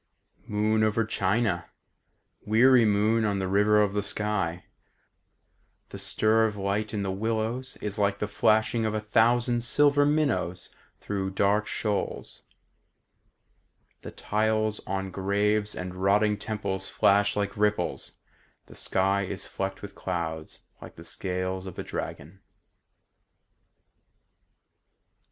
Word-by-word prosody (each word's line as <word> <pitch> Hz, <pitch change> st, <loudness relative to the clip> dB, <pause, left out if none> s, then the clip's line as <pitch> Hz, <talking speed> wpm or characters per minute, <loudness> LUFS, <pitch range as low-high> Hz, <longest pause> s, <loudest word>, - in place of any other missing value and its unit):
"Moon 110 Hz, 0 st, +1 dB
over 110 Hz, +1 st, +1 dB
China, 100 Hz, -2 st, 0 dB, 0.7 s
Weary 120 Hz, +2 st, +5 dB
moon 110 Hz, +2 st, +2 dB
on 105 Hz, -2 st, 0 dB
the 95 Hz, -1 st, -2 dB
river 105 Hz, +2 st, +3 dB
of 105 Hz, -2 st, +2 dB
the 105 Hz, -, 0 dB
sky, 100 Hz, -4 st, -2 dB, 1.2 s
The -, -, -8 dB
stir 110 Hz, +1 st, +2 dB
of 105 Hz, -, -5 dB
light 100 Hz, +2 st, -1 dB
in 105 Hz, -2 st, -2 dB
the 95 Hz, -, -2 dB
willows 115 Hz, +5 st, -2 dB
is 105 Hz, 0 st, -3 dB
like 100 Hz, -1 st, +1 dB
the 105 Hz, -, -2 dB
flashing 110 Hz, +2 st, +2 dB
of 110 Hz, -1 st, -1 dB
a -, -, 0 dB
thousand 120 Hz, +3 st, +2 dB
silver 145 Hz, +3 st, +3 dB
minnows 140 Hz, -, 0 dB, 0.3 s
Through 95 Hz, -2 st, -2 dB
dark 105 Hz, +2 st, +2 dB
shoals; 105 Hz, -2 st, -3 dB, 1.6 s
The -, -, -8 dB
tiles 110 Hz, 0 st, -1 dB
on 95 Hz, 0 st, -3 dB
graves 105 Hz, +2 st, 0 dB
and 90 Hz, 0 st, -5 dB
rotting 100 Hz, +3 st, +2 dB
temples 100 Hz, -2 st, -4 dB
flash 100 Hz, +1 st, +3 dB
like 100 Hz, -1 st, -2 dB
ripples, 105 Hz, -4 st, -1 dB, 0.5 s
The -, -, -15 dB
sky 95 Hz, +1 st, +1 dB
is 95 Hz, 0 st, -5 dB
flecked 95 Hz, 0 st, -5 dB
with 100 Hz, -1 st, -8 dB
clouds 80 Hz, -5 st, -5 dB, 0.2 s
like -, -, -11 dB
the 85 Hz, -, -11 dB
scales 95 Hz, +1 st, -4 dB
of 90 Hz, -, -9 dB
a -, -, -4 dB
dragon." 85 Hz, +7 st, -7 dB
105 Hz, 125 wpm, -27 LUFS, 95-110 Hz, 1.6 s, Weary